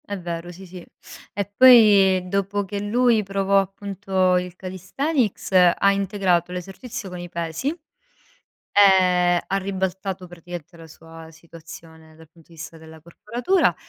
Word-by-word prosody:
È 205 Hz, -, -5 dB
vero, 175 Hz, 0 st, -6 dB
sì, 185 Hz, +2 st, -12 dB
sì. 180 Hz, -1 st, -11 dB, 0.5 s
E 200 Hz, 0 st, -2 dB
poi 205 Hz, -7 st, +6 dB
dopo 200 Hz, +1 st, -2 dB
che 200 Hz, +1 st, -5 dB
lui 230 Hz, +2 st, +2 dB
provò 195 Hz, 0 st, +1 dB
appunto 195 Hz, -1 st, -1 dB
il 180 Hz, -1 st, -5 dB
calisthenics 200 Hz, -, -3 dB, 0.3 s
ha 200 Hz, -, +3 dB
integrato 190 Hz, -3 st, 0 dB
l'esercizio 195 Hz, +6 st, -7 dB
con 180 Hz, -1 st, -8 dB
i 175 Hz, 0 st, -8 dB
pesi, 170 Hz, -, -5 dB, 1.0 s
ehm, 180 Hz, -3 st, +4 dB
ha 195 Hz, -, -1 dB
ribaltato 190 Hz, -1 st, -4 dB
praticamente 175 Hz, -1 st, -11 dB
la 165 Hz, -1 st, -13 dB
sua 165 Hz, 0 st, -14 dB
situazione 160 Hz, -1 st, -15 dB
dal 160 Hz, -1 st, -18 dB
punto 165 Hz, -1 st, -23 dB
di -, -, -17 dB
vista 165 Hz, +1 st, -10 dB
della 160 Hz, 0 st, -15 dB
corporatura 240 Hz, -, -1 dB
185 Hz, 140 wpm, -22 LUFS, 170-200 Hz, 1.0 s, poi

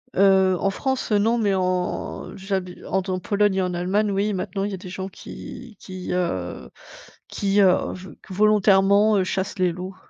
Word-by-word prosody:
Heu, 190 Hz, -1 st, +4 dB
en 195 Hz, -, +1 dB
France, 265 Hz, +2 st, -2 dB
non, 220 Hz, +3 st, +3 dB
mais 205 Hz, -3 st, +1 dB
en 185 Hz, -1 st, -2 dB
j'habite 190 Hz, -2 st, -4 dB
en 190 Hz, -, 0 dB
t 185 Hz, -, -4 dB
Pologne 205 Hz, +1 st, +1 dB
et 190 Hz, -, +1 dB
en 180 Hz, -1 st, -1 dB
Allemagne, 200 Hz, +4 st, 0 dB
oui, 205 Hz, +2 st, 0 dB
maintenant, 195 Hz, +1 st, -3 dB
il 205 Hz, -, -2 dB
y -, -, -5 dB
a -, -, -3 dB
des 185 Hz, 0 st, -10 dB
gens 190 Hz, +1 st, -5 dB
qui 220 Hz, +3 st, -10 dB
qui, 185 Hz, -1 st, -8 dB
heu, 90 Hz, -, -3 dB, 0.6 s
qui, 200 Hz, 0 st, +1 dB
heu, 185 Hz, -2 st, +5 dB, 0.2 s
vol 185 Hz, 0 st, -11 dB
volontairement, 205 Hz, +1 st, +4 dB
heu, 190 Hz, -, +2 dB
chassent 190 Hz, +1 st, -3 dB
les 180 Hz, -1 st, +3 dB
loups. 185 Hz, +2 st, -7 dB
195 Hz, 185 wpm, -23 LUFS, 185-205 Hz, 0.6 s, heu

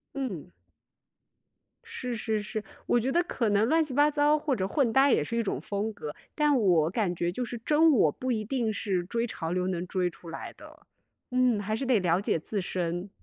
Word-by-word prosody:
嗯。 205 Hz, -, -4 dB, 1.3 s
是 250 Hz, -2 st, -5 dB
是 220 Hz, -1 st, -1 dB
是， 215 Hz, 0 st, -5 dB, 0.2 s
我 240 Hz, -, +3 dB
觉 255 Hz, +4 st, -1 dB
得 345 Hz, +3 st, +3 dB
可 235 Hz, -10 st, -1 dB
能 205 Hz, +2 st, +3 dB
乱 320 Hz, +3 st, +3 dB
七 295 Hz, -4 st, -6 dB
八 290 Hz, +2 st, +4 dB
糟 295 Hz, +1 st, +3 dB
或 295 Hz, -3 st, -1 dB
者 190 Hz, -2 st, -1 dB
混 260 Hz, -1 st, +1 dB
搭 270 Hz, +2 st, +5 dB
也 -, -, +3 dB
是 230 Hz, -, -3 dB
一 230 Hz, -, +1 dB
种 195 Hz, -, -2 dB
风 205 Hz, +2 st, -2 dB
格， 150 Hz, -7 st, -7 dB, 0.2 s
但 295 Hz, -3 st, +3 dB
我 175 Hz, -8 st, +3 dB
感 185 Hz, -2 st, -1 dB
觉 170 Hz, +1 st, -1 dB
就 250 Hz, +7 st, -3 dB
是 240 Hz, -, -6 dB
真 315 Hz, +1 st, +5 dB
我 200 Hz, -, +4 dB
不 255 Hz, -, -3 dB
一 215 Hz, -2 st, -1 dB
定 230 Hz, -1 st, -1 dB
是 195 Hz, -4 st, -1 dB
追 230 Hz, +6 st, -1 dB
潮 165 Hz, -7 st, -5 dB
流 180 Hz, 0 st, 0 dB
能 180 Hz, -1 st, -2 dB
追 180 Hz, -2 st, 0 dB
出 170 Hz, 0 st, -12 dB
来 -, -, -7 dB
的。 -, -, -16 dB, 0.4 s
嗯， 250 Hz, -4 st, +3 dB
还 215 Hz, +2 st, -2 dB
是 265 Hz, +4 st, -3 dB
得 245 Hz, -5 st, +3 dB
了 175 Hz, 0 st, +2 dB
解 170 Hz, -, 0 dB
自 200 Hz, +5 st, -3 dB
身。 175 Hz, +1 st, -3 dB
220 Hz, 230 characters per minute, -28 LUFS, 185-260 Hz, 1.3 s, 搭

